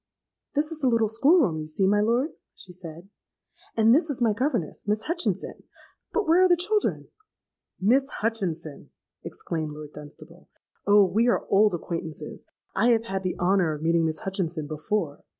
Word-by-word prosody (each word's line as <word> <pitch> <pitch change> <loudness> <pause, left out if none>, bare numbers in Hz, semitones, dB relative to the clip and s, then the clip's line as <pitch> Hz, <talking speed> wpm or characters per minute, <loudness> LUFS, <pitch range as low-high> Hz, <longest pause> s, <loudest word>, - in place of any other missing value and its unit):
'This 300 +3 +1
is 320 - -5
the 275 - +1
little 230 -2 +3
school 275 - +4
room, 165 -9 -1
you 155 - -6
see, 155 +5 0
my 205 +2 +3
lord,' 240 +8 +1 0.2
she 180 - -9
said; 170 0 -11 0.7
'and 225 +1 +5
this 315 +4 +3
is 280 - -3
my 230 -3 +2
governess, 235 - -2
Miss 210 +1 0
Hutchinson. 340 +1 -3 0.5
But 440 - 0
where 340 +3 +5
are 370 - +5
the 350 - +5
children?'—'Miss 350 - -2
Hutchinson!' 190 - -3 0.3
exclaimed 155 -3 -5
Lord 150 0 -10
Dunstable; 155 +4 -13 0.4
'Oh! 205 0 +6
we 220 +6 +1
are 240 - +1
old 205 -1 +4
acquaintances: 165 -2 -6 0.3
I 220 +5 +3
have 230 -2 +3
had 195 -4 -3
the 185 -1 -3
honour 180 -3 +2
of 150 - -9
meeting 165 0 +2
Miss 155 - -4
Hutchinson 175 -5 -3
before. 155 +1 -3
205 Hz, 170 wpm, -26 LUFS, 165-245 Hz, 0.7 s, Oh